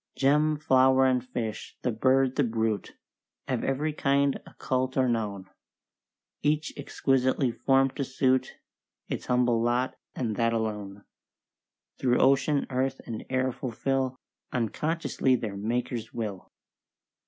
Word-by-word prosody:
"Gem, 150 +3 +3
flower, 130 -2 +4
and 130 -2 +2
fish, 120 -4 -5
the 125 - +1
bird, 130 +3 +2
the 145 - +3
brute, 110 -4 -1 0.5
Of - - -1
every 150 +3 0
kind 140 -1 +2
occult 130 0 -2
or 130 -1 +3
known 105 -5 -2 0.9
(Each 150 +1 0
exquisitely 135 -2 +1
form'd 135 +2 +2
to 140 - 0
suit 130 0 +1 0.5
Its - - -4
humble 125 -2 +2
lot, 120 +2 +1 0.2
and 115 -5 -2
that 115 0 +2
alone), 105 -3 -3 1.0
Through 125 -2 +2
ocean, 140 +2 +3
earth, 130 +1 0
and 115 -2 -5
air 130 0 +1
fulfil 130 +1 -2 0.4
Unconsciously 130 +3 0
their 110 -5 -4
Maker's 115 +2 -2
will." 105 -5 -5
130 Hz, 120 wpm, -28 LUFS, 115-135 Hz, 1.0 s, flower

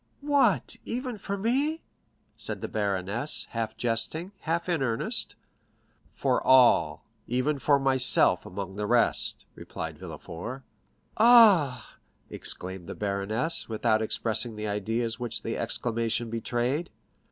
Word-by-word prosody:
"What, 285 -2 +2
even 245 -2 -4
for 200 0 -4
me?" 275 +10 0 0.5
said - - -3
the - - -3
baroness, 100 +5 -2
half 115 -1 -3
jesting, 120 - -2
half 170 +2 -2
in 170 -5 0
earnest. 115 -3 0 0.8
"For - - +1
all, 130 -2 +4 0.2
even 130 +4 0
for 140 +2 +3
myself 130 -2 +3
among 95 +1 -7
the 105 0 -2
rest," 120 +1 +1
replied - - -7
Villefort. 115 +11 -8
50063m - - -33 0.6
"Ah!" 200 - +6 0.4
exclaimed 95 -1 -4
the - - -6
baroness, 105 +11 -1
without 110 0 +1
expressing 110 +1 -1
the 105 0 -4
ideas 115 +3 -2
which 120 -2 -3
the - - -3
exclamation 115 -1 -1
betrayed. 120 +7 -2
120 Hz, 120 wpm, -27 LUFS, 110-160 Hz, 0.8 s, Ah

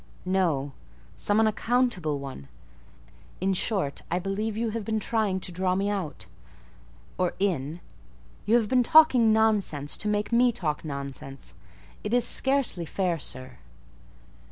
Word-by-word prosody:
"No; 170 -7 0 0.4
some 205 +1 +1
unaccountable 220 - +1
one. 135 - -8 0.9
In 190 +1 +1
short, 185 -7 -1
I 175 - 0
believe 200 +4 -3
you 225 0 -1
have 225 0 -4
been 220 +1 -1
trying 210 -3 0
to 185 - -4
draw 185 +1 0
me 200 +2 0
out—or 95 - -7
in; 170 -4 -1 0.7
you 225 - +4
have 230 -3 +3
been 255 +3 +3
talking 255 -5 +6
nonsense 210 -10 +2
to - - -4
make 210 +1 -1
me 245 +1 +4
talk 160 -10 -3
nonsense. 140 - -7 0.5
It 210 +3 0
is 245 -1 +3
scarcely 265 -9 +1
fair, 180 -2 -1
sir." 130 -2 -7
195 Hz, 130 wpm, -26 LUFS, 150-220 Hz, 0.9 s, talking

